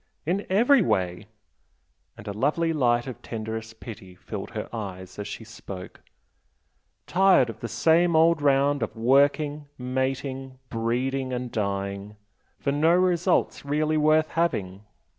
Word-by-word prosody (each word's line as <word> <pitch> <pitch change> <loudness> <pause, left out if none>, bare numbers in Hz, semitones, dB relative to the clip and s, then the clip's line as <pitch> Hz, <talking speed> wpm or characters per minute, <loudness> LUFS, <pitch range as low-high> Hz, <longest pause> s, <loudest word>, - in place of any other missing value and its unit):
"In 185 +6 -1
every 240 +7 +5
way!" 90 - -1 0.9
and 105 - -11
a 100 - -3
lovely 155 +9 +1
light 120 -5 +2
of 130 -5 -8
tenderest 110 0 -6
pity 95 -6 -10
filled 95 +2 -7
her 110 -2 -5
eyes 95 -3 -7
as 105 - -4
she 105 - -7
spoke 100 -4 -10 1.0
"Tired 185 -10 +4
of - - -15
the 115 - -4
same 170 +5 +3
old 165 0 +4
round 140 0 +3
of 115 - -3
working, 145 +5 +2
mating, 130 +1 -3
breeding 130 +3 -1
and 125 -1 -4
dying 100 0 -3 0.4
for 140 - -1
no 155 +4 +3
results 180 0 +1
really 150 +2 0
worth 155 +1 +3
having! 105 - -1
130 Hz, 135 wpm, -26 LUFS, 110-155 Hz, 1.0 s, every